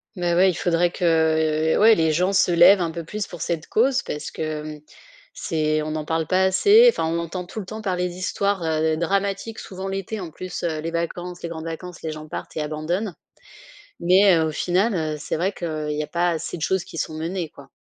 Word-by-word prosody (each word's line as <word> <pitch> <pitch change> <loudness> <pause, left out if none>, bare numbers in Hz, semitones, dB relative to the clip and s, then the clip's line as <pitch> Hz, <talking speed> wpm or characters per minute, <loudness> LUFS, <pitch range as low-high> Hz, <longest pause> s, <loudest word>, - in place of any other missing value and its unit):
Mais 175 -2 0
ouais, 185 +2 +5
il 180 - -1
faudrait 175 0 +1
que 160 -2 +2
ouais, 225 +2 +7
les 160 -3 +2
gens 180 +5 +1
se 185 -2 +3
lèvent 175 +3 +7
un 165 -2 -1
peu 170 0 -6
plus 210 +5 -4
pour 175 - -9
cette 165 -2 -2
cause, 255 +3 +2
parce 150 0 -6
que 155 -1 -5 0.5
c'est 155 -1 -1
on 155 - -4
n'en 155 -1 -3
parle 160 0 -1
pas 185 +4 +2
assez, 410 - +6
enfin, 460 - -1
on 165 +1 -1
entend 170 +2 -4
tout 195 - -7
le 200 - -6
temps 215 +2 -6
parler 180 -3 0
d'histoires, 185 +1 -1
heu, 160 0 +1
dramatiques 200 +5 -1
souvent 190 0 -7
l'été, 195 +3 -4
en 175 -4 -6
plus, 185 +2 -7
heu, 160 -3 -1
les 165 - -3
vacances, 175 +1 -4
les 170 - -3
grandes 160 -1 -6
vacances, 170 +2 -7
les 160 - -4
gens 155 0 -8
partent - - -7
et - - 0
abandonnent. 160 +7 -2 0.9
Mais 185 +1 +5
au 160 -1 0
final, 185 +8 +1
heu, 155 -3 -1
c'est - - -3
vrai 185 +5 0
qu'il 155 -5 -4
y - - 0
a - - -8
pas 175 +3 0
assez 165 +1 -4
de 160 - -9
choses 190 +1 0
qui 165 - -9
sont 155 - -3
menées 165 +2 -3
quoi. 140 -2 -15
170 Hz, 220 wpm, -23 LUFS, 160-190 Hz, 0.9 s, ouais